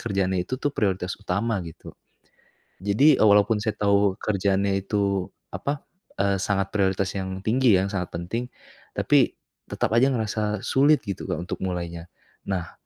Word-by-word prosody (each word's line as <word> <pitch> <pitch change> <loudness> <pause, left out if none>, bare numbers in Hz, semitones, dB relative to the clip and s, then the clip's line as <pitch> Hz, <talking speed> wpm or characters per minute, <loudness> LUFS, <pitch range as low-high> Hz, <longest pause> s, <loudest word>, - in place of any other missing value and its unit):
kerjaannya 95 -4 0
itu 130 - -3
tuh 145 - 0
prioritas 95 -6 -1
utama 105 +2 -1
gitu, 80 - -10 0.9
jadi 130 +8 +4
walaupun 105 0 +5
saya 110 -2 -1
tahu 100 -1 +3
kerjaannya 100 -1 0
itu 100 -3 0 0.2
apa, 140 0 -3 0.4
eee, 100 0 +2
sangat 95 -1 0
prioritas 95 -1 +1
yang 95 0 -4
tinggi 120 -1 +4
ya 95 - +1
yang - - -6
sangat 90 -2 -2
penting, 115 +9 -3 0.5
tapi - - +3 0.3
tetap - - -1
aja 130 +3 +5
ngerasa 105 -3 -1
sulit 145 +3 +4
gitu 100 -2 -5
Kak, - - 0
untuk 90 - -5
mulainya, 85 -2 -4 0.4
nah, 90 -4 -2
100 Hz, 150 wpm, -25 LUFS, 95-110 Hz, 0.9 s, walaupun